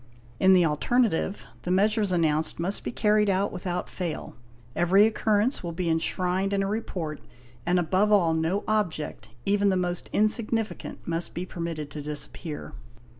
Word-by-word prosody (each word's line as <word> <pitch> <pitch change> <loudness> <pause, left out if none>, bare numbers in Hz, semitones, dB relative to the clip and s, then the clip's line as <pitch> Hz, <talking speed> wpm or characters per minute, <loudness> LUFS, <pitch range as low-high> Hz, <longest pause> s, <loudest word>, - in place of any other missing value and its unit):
In 190 0 +6
the 180 -2 +5
alternative, 195 - +1 0.2
the - - -5
measures 205 +2 +2
announced 160 -3 +1
must 185 +4 0
be - - -3
carried 210 -2 +3
out 195 +1 +1
without 180 -1 -3
fail. 170 -9 -5 0.4
Hvery 190 +4 +5
occurrence 220 +2 +1
will 170 -2 -4
be 170 0 -1
enshrined 180 +4 0
in 195 0 +1
a - - -1
report 185 -8 -3 0.5
and 180 +1 +3
above 185 +5 +2
all 175 -6 +4
no 165 +5 0
object, 165 - -1 0.2
even 200 0 +3
the 190 - +2
most 180 -1 -2
insignificant, 220 +1 -1
must 170 0 -3
be 175 - -3
permitted 165 -5 -5
to 150 - -5
disappear. 150 +1 -5
185 Hz, 155 wpm, -27 LUFS, 165-205 Hz, 0.5 s, In